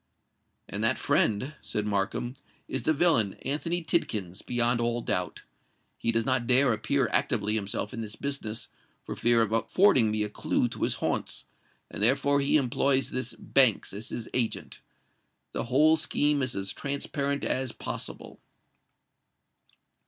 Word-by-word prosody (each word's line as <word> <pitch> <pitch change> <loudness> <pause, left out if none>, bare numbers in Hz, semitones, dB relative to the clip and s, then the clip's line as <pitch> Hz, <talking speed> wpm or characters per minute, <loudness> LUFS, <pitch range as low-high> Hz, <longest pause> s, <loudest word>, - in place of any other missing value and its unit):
"And - - -2
that - - +3
friend," 110 +7 +1
said 105 - -3
Markham, 105 +4 -1 0.3
"is - - -3
the - - +1
villain 140 - +3
Anthony 165 +5 -1
Tidkins—beyond 120 - 0
all 120 0 -1
doubt. 90 0 -2 0.5
He 115 - 0
does 115 0 0
not 130 -3 +1
dare 130 0 +4
appear 135 +6 0
actively 105 -1 +1
himself 105 +3 -2
in 115 - -5
this 110 -1 -6
business, 115 -6 -4 0.4
for - - -6
fear 120 -1 +3
of 110 - -3
affording 115 - +3
me 105 0 0
a 105 - -3
clue 115 - 0
to - - -8
his - - +1
haunts; - - -2 0.4
and - - -7
therefore 140 +5 +4
he 140 +2 +3
employs 135 0 +1
this 130 -1 -3
Banks 130 -9 +3
as 105 +3 -5
his 115 - -5
agent. 120 -3 -2 0.7
The - - -3
whole 150 +6 +4
scheme 150 -2 +1
is 130 -2 -2
as 95 0 -2
transparent 140 0 -3
as 130 -2 -1
possible." - - -6
120 Hz, 145 wpm, -27 LUFS, 110-140 Hz, 0.7 s, dare